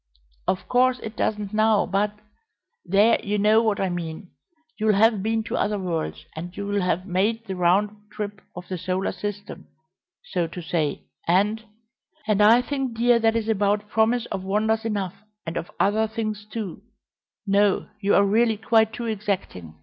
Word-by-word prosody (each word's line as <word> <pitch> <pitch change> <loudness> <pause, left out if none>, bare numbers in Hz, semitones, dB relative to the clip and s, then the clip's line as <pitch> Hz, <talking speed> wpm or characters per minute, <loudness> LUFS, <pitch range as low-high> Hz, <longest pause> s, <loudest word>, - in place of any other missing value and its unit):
Of 185 - -1
course 255 0 +3
it 220 0 -6
doesn't 210 -1 -2
now, 215 0 +3
but 200 +2 0 0.7
there, 205 +5 +3
you 210 +1 -1
know 215 +2 +4
what 215 -3 0
I 195 - 0
mean. 175 +1 -5 0.5
You'll 215 -1 +3
have 220 0 +4
been 220 +2 0
to - - -4
other 210 0 0
worlds, 175 -5 -3 0.3
you'll 200 +1 -2
have 180 0 0
made 210 +5 0
the 190 - -4
round 190 +4 +2 0.2
trip 205 -3 -5
of 175 +1 -8
the 185 -2 -4
Solar 185 +2 -1
System, 205 0 -6 0.6
so 175 -2 -1
to 170 +2 -8
say, 160 -4 -2 0.2
and 205 +5 +2 0.3
" - - -32
"And 210 -1 +2
I 230 +4 +6
think, 265 -4 -3
dear, 240 0 +4
that 225 0 +2
is 225 -1 -1
about 205 -1 +1
promise 225 +2 +2
of 190 - -3
wonders 220 +3 0
enough, 200 -5 -2 0.3
and 165 - -5
of 170 - -4
other 215 +2 +2
things 215 -1 -4
too 215 -6 -5 0.6
no, 200 0 +2
you 200 -1 +2
are 200 - +5
really 220 +2 +2
quite 220 0 +3
too 240 - -5
exacting. 195 - -3
210 Hz, 170 wpm, -24 LUFS, 190-220 Hz, 0.7 s, I